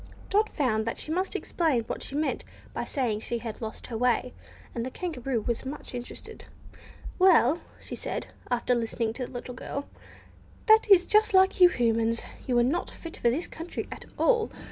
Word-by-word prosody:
Dot 425 Hz, +2 st, +3 dB
found 225 Hz, -7 st, 0 dB
that 230 Hz, -, -2 dB
she 310 Hz, -, -5 dB
must 370 Hz, +4 st, -1 dB
explain 305 Hz, -9 st, +1 dB
what -, -, -5 dB
she 275 Hz, -, -4 dB
meant 305 Hz, +1 st, 0 dB, 0.3 s
by -, -, -2 dB
saying 240 Hz, -7 st, -1 dB
she 235 Hz, +2 st, -3 dB
had 230 Hz, -1 st, -6 dB
"lost 220 Hz, -1 st, -5 dB
her 235 Hz, -, -6 dB
way," 250 Hz, 0 st, +1 dB, 0.4 s
and 230 Hz, -, -2 dB
the 255 Hz, -, -3 dB
Kangaroo 265 Hz, -7 st, -3 dB
was 235 Hz, +1 st, -2 dB
much 270 Hz, +1 st, -7 dB
interested. 245 Hz, 0 st, -7 dB, 0.7 s
"Well," 340 Hz, -5 st, +5 dB, 0.2 s
said -, -, -4 dB
she, -, -, -20 dB, 0.2 s
after 245 Hz, 0 st, +1 dB
listening 230 Hz, -1 st, -1 dB
to 250 Hz, 0 st, -4 dB
the -, -, -14 dB
little 245 Hz, 0 st, -6 dB
girl, 280 Hz, +3 st, -5 dB, 0.8 s
"that 440 Hz, -1 st, +6 dB
is 370 Hz, -3 st, +8 dB
just 425 Hz, 0 st, +4 dB
like 380 Hz, 0 st, +5 dB
you 360 Hz, -, +10 dB
Humans; 230 Hz, -3 st, +1 dB, 0.2 s
you 250 Hz, -2 st, +2 dB
are 240 Hz, -, +5 dB
not 295 Hz, +9 st, 0 dB
fit 330 Hz, -, -9 dB
for 240 Hz, -, +3 dB
this 295 Hz, +9 st, -1 dB
country 330 Hz, +2 st, -6 dB
at -, -, -8 dB
all! 465 Hz, -3 st, +3 dB
255 Hz, 190 wpm, -28 LUFS, 235-345 Hz, 0.8 s, you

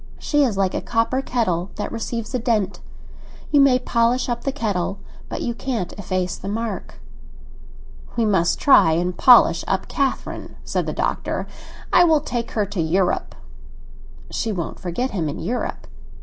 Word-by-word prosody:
She 295 Hz, -1 st, +2 dB
is 230 Hz, -7 st, 0 dB
like 190 Hz, -2 st, +1 dB
a -, -, -2 dB
copper 235 Hz, +3 st, 0 dB
kettle 195 Hz, -9 st, -1 dB
that 210 Hz, -, -4 dB
receives 230 Hz, 0 st, -4 dB
a 255 Hz, -, 0 dB
dent; 215 Hz, -5 st, 0 dB, 0.7 s
you 290 Hz, -, +6 dB
may 270 Hz, -2 st, +5 dB
polish 245 Hz, 0 st, +1 dB
up 240 Hz, -1 st, -3 dB
the 275 Hz, -, +1 dB
kettle, 200 Hz, -7 st, -2 dB, 0.3 s
but -, -, -4 dB
you 235 Hz, -, -1 dB
can't 230 Hz, -7 st, -3 dB
efface 185 Hz, -2 st, -2 dB
the 190 Hz, -, -8 dB
mark." 215 Hz, 0 st, -4 dB, 1.2 s
"We 230 Hz, -2 st, +2 dB
must 190 Hz, -5 st, +2 dB
try 165 Hz, -, +6 dB
and 175 Hz, +2 st, 0 dB
polish 240 Hz, -9 st, +6 dB
up 190 Hz, -1 st, -1 dB
Catherine," 275 Hz, -2 st, -2 dB
said -, -, -2 dB
the -, -, -1 dB
Doctor. -, -, -2 dB, 0.5 s
"I 350 Hz, -, +7 dB
will 320 Hz, -3 st, +4 dB
take 235 Hz, -1 st, -3 dB
her 210 Hz, -2 st, +1 dB
to 200 Hz, -3 st, -3 dB
Europe." 180 Hz, +3 st, 0 dB, 1.0 s
"She 225 Hz, -, -2 dB
won't 175 Hz, -6 st, -4 dB
forget 215 Hz, +9 st, -2 dB
him 165 Hz, -6 st, -1 dB
in -, -, -5 dB
Europe." 225 Hz, +8 st, -3 dB
220 Hz, 165 wpm, -22 LUFS, 185-245 Hz, 1.2 s, I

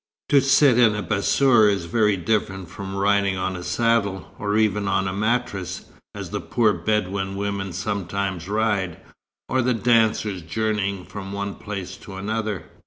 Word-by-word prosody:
"To 140 Hz, -, +6 dB
sit 135 Hz, -2 st, +5 dB
in 115 Hz, -3 st, +5 dB
a 105 Hz, -, -3 dB
bassour 110 Hz, +2 st, +4 dB
is 100 Hz, -4 st, -1 dB
very 105 Hz, +3 st, +2 dB
different 95 Hz, -2 st, -1 dB
from 95 Hz, +2 st, -7 dB
riding 100 Hz, -1 st, +2 dB
on 95 Hz, 0 st, -2 dB
a 90 Hz, -, -6 dB
saddle, 100 Hz, +1 st, 0 dB
or 105 Hz, 0 st, 0 dB
even 105 Hz, -2 st, +1 dB
on 95 Hz, 0 st, +1 dB
a 95 Hz, -, -2 dB
mattress, 105 Hz, -3 st, -2 dB, 0.3 s
as -, -, -6 dB
the -, -, -3 dB
poor 110 Hz, -3 st, +2 dB
Bedouin 95 Hz, +1 st, -1 dB
women 100 Hz, -1 st, -3 dB
sometimes 95 Hz, -1 st, -3 dB
ride, 105 Hz, -5 st, 0 dB, 0.5 s
or 130 Hz, -, +1 dB
the 125 Hz, 0 st, +1 dB
dancers 110 Hz, -4 st, +2 dB
journeying 100 Hz, +1 st, -2 dB
from 100 Hz, -1 st, -7 dB
one 100 Hz, 0 st, -3 dB
place 100 Hz, -3 st, -6 dB
to 105 Hz, -2 st, -11 dB
another. 105 Hz, -2 st, -3 dB
100 Hz, 160 wpm, -23 LUFS, 95-110 Hz, 0.5 s, To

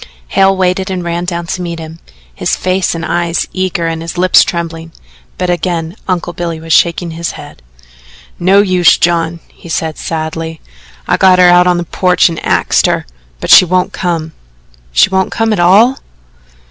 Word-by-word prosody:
Hale 195 Hz, 0 st, +2 dB
waited 185 Hz, +1 st, 0 dB
and 185 Hz, -2 st, -3 dB
ran 170 Hz, +1 st, -3 dB
down 170 Hz, -1 st, -4 dB
to 180 Hz, +2 st, -4 dB
meet 170 Hz, -1 st, -5 dB
him, 160 Hz, 0 st, -9 dB, 0.3 s
his -, -, -1 dB
face 185 Hz, -1 st, -1 dB
and 165 Hz, 0 st, -4 dB
eyes 170 Hz, -1 st, -1 dB
eager 185 Hz, -2 st, -2 dB
and 165 Hz, -1 st, -3 dB
his 165 Hz, +1 st, -7 dB
lips 185 Hz, +1 st, +5 dB
trembling, 165 Hz, -1 st, -5 dB, 0.5 s
but 180 Hz, -1 st, -1 dB
again 170 Hz, 0 st, -3 dB
Uncle 175 Hz, -2 st, -2 dB
Billy 170 Hz, -2 st, -4 dB
was 160 Hz, 0 st, -3 dB
shaking 170 Hz, +1 st, +2 dB
his 165 Hz, +1 st, -4 dB
head. -, -, -12 dB, 0.8 s
"No 190 Hz, +3 st, +4 dB
use, 185 Hz, -3 st, +3 dB
John," 170 Hz, -1 st, 0 dB
he 170 Hz, -, -15 dB
said 160 Hz, -1 st, -3 dB
sadly. 160 Hz, 0 st, -4 dB, 0.5 s
"I -, -, +2 dB
got 185 Hz, -1 st, +5 dB
her 180 Hz, -1 st, +6 dB
out 175 Hz, 0 st, +5 dB
on 180 Hz, -1 st, +2 dB
the 175 Hz, -, -2 dB
porch 180 Hz, +2 st, +2 dB
and 165 Hz, -, -6 dB
axed -, -, +1 dB
her, -, -, -1 dB, 0.3 s
but -, -, -2 dB
she -, -, +9 dB
won't 185 Hz, +1 st, 0 dB
come." 165 Hz, -3 st, -3 dB, 0.6 s
"She -, -, +4 dB
won't 190 Hz, 0 st, 0 dB
come 225 Hz, -1 st, 0 dB
at 210 Hz, -, -2 dB
all?" 205 Hz, +9 st, +4 dB
175 Hz, 180 wpm, -12 LUFS, 165-185 Hz, 0.8 s, she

